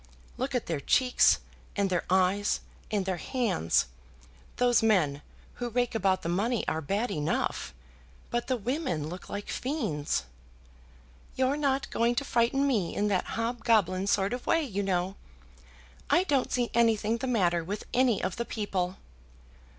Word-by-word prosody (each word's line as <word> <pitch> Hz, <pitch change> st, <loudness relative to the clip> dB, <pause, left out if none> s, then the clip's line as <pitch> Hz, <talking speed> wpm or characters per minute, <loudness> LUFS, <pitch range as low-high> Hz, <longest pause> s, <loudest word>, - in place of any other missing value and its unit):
Look 260 Hz, +1 st, -3 dB
at 245 Hz, -, 0 dB
their 165 Hz, -4 st, -2 dB
cheeks, 250 Hz, -, +4 dB, 0.4 s
and 200 Hz, -2 st, +1 dB
their 180 Hz, -, 0 dB
eyes, 190 Hz, +2 st, +2 dB, 0.3 s
and 205 Hz, -3 st, 0 dB
their 190 Hz, -2 st, -1 dB
hands. 200 Hz, -, +1 dB, 0.7 s
Those 245 Hz, -1 st, +3 dB
men 175 Hz, -11 st, +2 dB, 0.4 s
who 240 Hz, -, -1 dB
rake 245 Hz, +1 st, 0 dB
about 195 Hz, -4 st, +1 dB
the -, -, -3 dB
money 210 Hz, +7 st, 0 dB
are 160 Hz, -, -1 dB
bad 200 Hz, +9 st, -1 dB
enough, 150 Hz, -3 st, -1 dB, 0.6 s
but 240 Hz, 0 st, -1 dB
the 260 Hz, -2 st, +1 dB
women 235 Hz, -, -2 dB
look 180 Hz, +2 st, -8 dB
like 205 Hz, 0 st, -5 dB
fiends." 215 Hz, -, -1 dB, 1.1 s
"You're 260 Hz, +2 st, +2 dB
not 275 Hz, -2 st, 0 dB
going 235 Hz, +1 st, +2 dB
to 280 Hz, -, -1 dB
frighten 240 Hz, +3 st, +2 dB
me 220 Hz, -11 st, 0 dB
in 210 Hz, +1 st, +1 dB
that 190 Hz, -3 st, +1 dB
hobgoblin 225 Hz, -5 st, +1 dB
sort 200 Hz, +1 st, +2 dB
of 245 Hz, -, -5 dB
way, 330 Hz, -, +3 dB
you 205 Hz, -8 st, -2 dB
know. 190 Hz, 0 st, -1 dB, 0.9 s
I 360 Hz, -, +4 dB
don't 280 Hz, -8 st, +1 dB
see 245 Hz, -1 st, 0 dB
anything 225 Hz, -1 st, +2 dB
the 260 Hz, -, -3 dB
matter 175 Hz, -8 st, +2 dB
with 200 Hz, +5 st, -4 dB
any 245 Hz, -4 st, +3 dB
of 185 Hz, 0 st, -2 dB
the 235 Hz, -, -2 dB
people." 190 Hz, -5 st, -2 dB
215 Hz, 155 wpm, -29 LUFS, 185-245 Hz, 1.1 s, cheeks